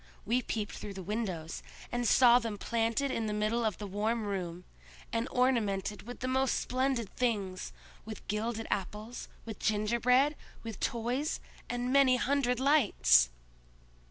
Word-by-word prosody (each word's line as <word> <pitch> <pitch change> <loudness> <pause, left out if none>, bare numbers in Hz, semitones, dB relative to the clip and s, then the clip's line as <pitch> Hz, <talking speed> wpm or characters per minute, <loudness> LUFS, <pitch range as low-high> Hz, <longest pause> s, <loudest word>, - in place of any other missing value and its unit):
We 240 +4 +2
peeped 215 -3 -3
through 200 -2 -7
the 190 - -6
windows, 185 -6 -3 0.3
and 240 0 0
saw 245 0 +7
them 225 -3 -4
planted 230 +5 0
in 225 -3 -1
the 210 - -1
middle 215 +3 +1
of 215 -5 0
the 210 - -6
warm 215 +4 -1
room, 180 -3 -4 0.5
and 230 +2 0
ornamented 210 -5 0
with 245 - -8
the 255 - -1
most 260 0 +2
splendid 255 -4 -1
things—with 215 -1 -4
gilded 220 +2 -2
apples, 210 +5 -4 0.2
with 220 -2 -7
gingerbread, 235 +7 +2 0.3
with 225 -4 -6
toys, 245 +6 -1 0.3
and 245 +1 -1
many 275 -2 +6
hundred 250 -1 +1
lights!" 225 - +5
230 Hz, 140 wpm, -31 LUFS, 210-250 Hz, 0.5 s, saw